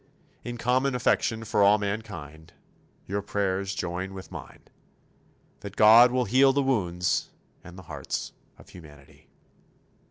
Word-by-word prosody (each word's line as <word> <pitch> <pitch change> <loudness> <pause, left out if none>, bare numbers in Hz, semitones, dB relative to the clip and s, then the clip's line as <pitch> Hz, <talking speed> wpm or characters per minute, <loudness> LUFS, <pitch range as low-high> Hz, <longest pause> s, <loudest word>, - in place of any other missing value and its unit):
In 120 0 -6
common 125 +3 0
affection 115 -2 0
for 105 -2 0
all 100 +1 +5
mankind, 90 -7 -6 0.5
your 100 +2 -3
prayers 100 -1 -2
join 90 +2 -4
with 95 - -10
mine - - -10 1.0
that 100 -1 -9
God 115 +3 +7
will 125 0 0
heal 130 +5 +4
the 140 +1 +1
wounds 90 -9 -1 0.3
and 90 +1 -13
the 95 - -11
hearts - - -5 0.3
of - - -18
humanity. 75 -5 -16
100 Hz, 130 wpm, -26 LUFS, 90-120 Hz, 1.0 s, God